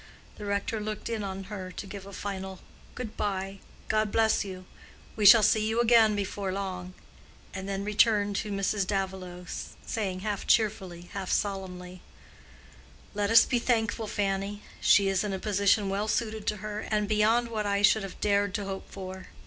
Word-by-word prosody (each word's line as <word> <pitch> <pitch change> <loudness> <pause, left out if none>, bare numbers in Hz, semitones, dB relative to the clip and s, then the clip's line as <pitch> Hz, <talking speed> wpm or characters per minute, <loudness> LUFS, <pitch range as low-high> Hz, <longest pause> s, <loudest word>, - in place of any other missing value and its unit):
The 210 - -7
rector 200 +2 -1
looked 215 +1 -4
in 225 -2 -2
on 195 0 -5
her 190 -2 -7
to - - -6
give 195 0 -8
a - - -9
final 190 -1 -5 0.4
"Good 235 -4 -6
bye; 195 -1 -3 0.3
God 215 -1 +1
bless 220 -1 +3
you; 185 -2 -8 0.5
we 210 -2 +4
shall 220 +2 +9
see 215 +1 +3
you 225 +1 0
again 230 -2 +5
before 200 -1 -3
long," 185 -2 -5 0.6
and 190 0 -5
then 195 0 -2
returned 210 -1 +3
to 210 - -3
Mrs. 195 0 0
Davilow, 190 -2 -3 0.4
saying 190 -4 -3
half 205 -1 -3
cheerfully, 190 -6 +1
half 195 -2 -4
solemnly, 185 -2 -3 1.1
"Let 205 -1 0
us 225 - +8
be 245 - +1
thankful, 225 -2 0
Fanny. 200 0 -2 0.2
She 200 -1 +5
is 195 0 +1
in 205 -2 -2
a - - -1
position 200 0 +2
well 200 +2 -1
suited 220 -1 -2
to 210 - 0
her, 210 0 -4
and 210 -1 -1
beyond 220 +3 +3
what 215 -2 -2
I 200 0 +1
should 220 +1 +5
have 195 -1 -8
dared 200 -1 +1
to 205 - -2
hope 195 0 -6
for. 190 -1 -8
200 Hz, 175 wpm, -28 LUFS, 190-215 Hz, 1.1 s, shall